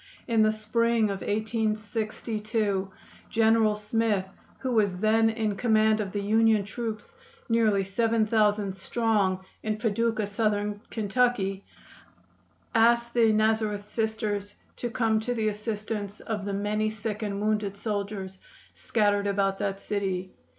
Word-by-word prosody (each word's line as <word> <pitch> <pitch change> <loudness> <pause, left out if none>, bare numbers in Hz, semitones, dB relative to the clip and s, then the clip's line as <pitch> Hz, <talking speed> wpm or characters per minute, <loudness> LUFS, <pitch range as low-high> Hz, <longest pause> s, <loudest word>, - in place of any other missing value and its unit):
In 230 -3 +3
the 215 0 +5
spring 220 0 +1
of 195 - -5
1862 215 -1 -1 0.4
General 225 -1 +3
Smith, 210 -2 0 0.3
who 260 - -3
was 205 -6 +2
then 220 +3 +3
in 220 -2 -1
command 220 -1 +3
of 195 -2 -4
the 205 0 -3
Union 220 0 +3
troops, 230 - -5 0.3
nearly 220 -4 +3
seven 225 +3 +1
thousand 210 -3 +2
strong, 195 -2 0 0.2
in 215 -1 -2
Paducah, 225 0 0
Southern 205 0 -1
Kentucky, 210 -3 0 1.1
asked 235 0 +3
the 230 -2 +4
Nazareth 215 -1 +1
Sisters 210 -2 -2 0.2
to 240 - -3
come 225 -2 +1
to 245 +3 -2
the 220 -2 +1
assistance 210 -1 -4
of 210 -3 -4
the 200 - -2
many 210 +2 0
sick 215 0 -4
and 200 -2 -2
wounded 210 -1 -1
soldiers 200 -3 -4 0.3
scattered 205 -2 +1
about 195 -1 0
that 195 -1 -2
city. 190 -3 -2
215 Hz, 130 wpm, -27 LUFS, 205-225 Hz, 1.1 s, the